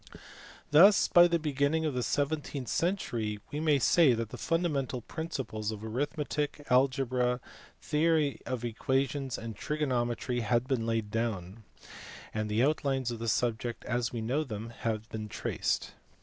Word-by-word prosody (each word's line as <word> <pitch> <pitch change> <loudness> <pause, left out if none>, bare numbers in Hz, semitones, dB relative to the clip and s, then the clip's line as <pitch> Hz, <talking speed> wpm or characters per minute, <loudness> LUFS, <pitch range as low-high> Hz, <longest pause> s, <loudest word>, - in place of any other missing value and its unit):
Thus 185 +7 +7
by 175 0 +7
the 170 -1 +2
beginning 150 +1 0
of 150 - 0
the 125 - -1
seventeenth 145 -1 -2
century 115 - -1
we 145 - -3
may 155 -2 +3
say 140 +1 +5
that 115 -1 -3
the - - -7
fundamental 145 -7 -1
principles 120 -7 -4
of 110 -1 -5
arithmetic, 145 +4 -2
algebra, 125 -1 +2 0.4
theory 155 -2 +1
of 125 -2 -3
equations, 135 +3 -1
and 115 -1 -6
trigonometry 125 -3 -1
had 120 +2 +1
been 120 -5 0
laid 115 -2 -1
down, 110 -2 -3 0.7
and 110 0 -2
the 110 +3 +2
outlines 135 -4 +1
of 115 - -5
the 115 - -4
subjects 120 +1 -1
as 120 -1 -1
we 115 - -4
know 130 +8 0
them 115 -4 -6
had 110 -1 -3
been 110 -1 -5
traced. - - -2
125 Hz, 150 wpm, -30 LUFS, 115-150 Hz, 0.7 s, Thus